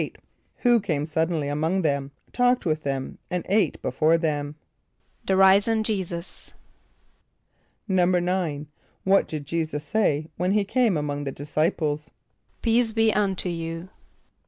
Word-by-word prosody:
= - - -44
Who 240 -2 +5
came 155 -8 -1
suddenly 160 -1 -1
among 160 +6 0
them, 140 -3 0 0.2
talked 245 -1 +2
with 155 -2 0
them, 135 -2 -4
and 180 -1 -2
ate 205 +2 +2
before 155 +6 +3
them? 150 -3 -2 0.7
=The 190 - +2
risen 200 +4 +5
J[=e]´[s+]us.= 185 -5 -4 1.3
=9.= 180 -4 +1 0.4
What 195 +1 +3
did 150 -2 -5
J[=e]´[s+]us 155 -1 -2
say 155 -4 +1
when 180 +3 +1
he 210 -1 +3
came 220 -2 +2
among 145 -1 -3
the 135 - -2
disciples? 150 +1 -1 0.5
="Peace 230 0 +3
be 225 -1 +3
unto 195 -3 0
you." 165 +1 -5
170 Hz, 130 wpm, -25 LUFS, 150-195 Hz, 1.3 s, Who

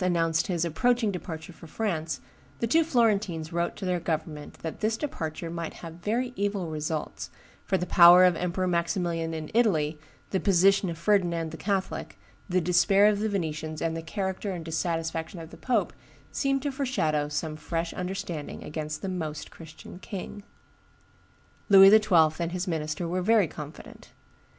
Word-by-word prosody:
announced 165 -2 +1
his 175 -2 0
approaching 225 +7 +1
departure 170 -2 -7
for 165 - -13
France, 170 -3 -2 0.4
the - - -1
two 320 +8 +4
Florentines 205 - +1
wrote 170 0 -1
to - - -6
their 180 -1 0
government 155 -2 -4
that 160 - -5
"this 220 +1 0
departure 165 - -4
might 170 -1 -5
have 165 -1 -9
very 235 +7 -2
evil 200 -4 -2
results, 155 0 -4 0.4
for 190 - +2
the 180 - -2
power 175 +1 +8
of 180 -1 +4
Emperor 180 +2 -1
Maximilian 170 -1 -1
in 155 -1 -6
Italy, 160 -10 +2 0.3
the 190 - +1
position 195 0 +4
of 165 - -5
Ferdinand 170 -3 +1
the - - -7
Catholic, 195 0 -3 0.3
the 185 0 +2
despair 180 +3 +4
of 210 -1 +4
the 215 +1 0
Venetians, 155 -5 -3
and 165 0 -1
the 165 - -4
character 190 +3 -3
and 175 -4 -5
dissatisfaction 165 +1 -2
of 165 0 -10
the - - -10
pope, 255 - 0 0.4
seemed 275 -1 0
to 285 - -1
foreshadow 160 - 0
some 155 +1 -3
fresh 165 +2 -3
understanding 180 -5 -5
against 155 +2 -5
the - - -2
Most 160 -5 -4
Christian 160 +2 -12
king." 200 +1 -7 1.3
Louis 195 -1 +9
XII. 180 -8 +5
and 170 0 -2
his 180 0 -3
minister 160 0 -2
were 180 +2 -1
very 210 -1 +4
confident. 150 0 -10
175 Hz, 165 wpm, -27 LUFS, 160-195 Hz, 1.3 s, Louis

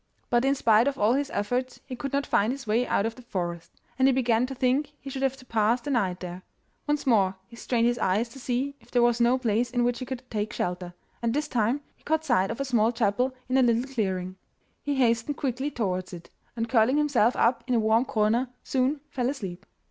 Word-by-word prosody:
But 240 +1 +3
in 275 +1 +3
spite 230 -1 +4
of 280 -1 -1
all 210 +3 +3
his 280 +1 0
efforts 245 +5 -2
he 260 - -6
could 275 +2 -5
not 280 0 0
find 210 +4 +2
his 270 -1 -6
way 225 +3 +1
out 200 - +1
of 225 - -2
the 250 - -14
forest, 175 -7 -5 0.2
and 260 - +5
he - - +5
began 245 -2 +2
to 270 - -6
think 265 +4 +1
he 275 - -8
should 265 - -4
have 270 0 0
to 255 - -15
pass 230 +1 +2
the 290 +4 -5
night 190 -8 0
there. 180 0 -6 0.5
Once 295 0 0
more 200 -7 +3
he 235 - -15
strained 235 0 0
his 240 0 +1
eyes 205 +6 +1
to 270 - -12
see 255 +2 -1
if - - -23
there 245 -1 +3
was 240 0 +3
no 240 +2 +4
place 240 -1 0
in 245 0 0
which 240 0 0
he 255 - -4
could 260 -1 -5
take 215 +1 -2
shelter, 180 0 -3 0.3
and 235 +1 0
this 300 +1 0
time 245 +2 0
he - - -32
caught 315 +1 0
sight 190 -9 +2
of 230 - -4
a 275 - -1
small 235 -3 +2
chapel 245 +3 0
in 260 +1 +2
a - - +5
little 235 -1 +3
clearing. 185 -5 -2 0.4
He 285 -1 -2
hastened 240 +2 +1
quickly 265 +1 -2
towards 185 -9 -3
it, 170 -1 -10 0.2
and 230 -1 -2
curling 245 +3 +3
himself 275 -6 +3
up 235 +1 +2
in 250 - +1
a - - +4
warm 220 +3 +3
corner 230 +3 +1
soon 270 +2 0
fell 250 -3 0
asleep. 195 -9 -6
240 Hz, 240 wpm, -27 LUFS, 215-265 Hz, 0.5 s, and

